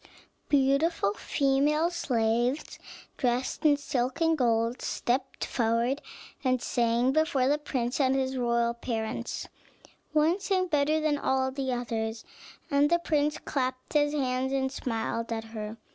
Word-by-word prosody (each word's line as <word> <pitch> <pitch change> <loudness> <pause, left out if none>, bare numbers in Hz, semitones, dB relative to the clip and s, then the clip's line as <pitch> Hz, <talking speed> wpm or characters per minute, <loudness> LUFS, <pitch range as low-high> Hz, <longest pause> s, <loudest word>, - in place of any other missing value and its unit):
Beautiful 275 -4 +2
female 290 +7 +1
slaves, 240 -3 0 0.4
dressed 250 -1 -1
in 290 -1 +5
silk 255 -2 -2
and 325 -1 +3
gold, 230 -2 +1
stepped 255 +2 -2
forward 235 +4 0 0.4
and 255 -1 +2
sang 235 +1 +1
before 280 -3 +2
the 295 +2 +2
prince 255 -4 -2
and 265 -1 +3
his 265 0 0
royal 235 -1 +1
parents: 230 -1 -4 0.6
one 310 +5 +3
sang 380 -2 +1
better 300 +1 +2
than 305 -2 +1
all 265 -1 +1
the 265 -1 -2
others, 225 -2 -3 0.5
and 285 +1 +4
the 345 - +4
prince 300 -3 0
clapped 255 -2 -3
his 290 -1 +3
hands 260 -2 0
and 265 -1 0
smiled 230 -2 -3
at 225 -1 -2
her. 215 0 -5
260 Hz, 135 wpm, -28 LUFS, 235-290 Hz, 0.6 s, in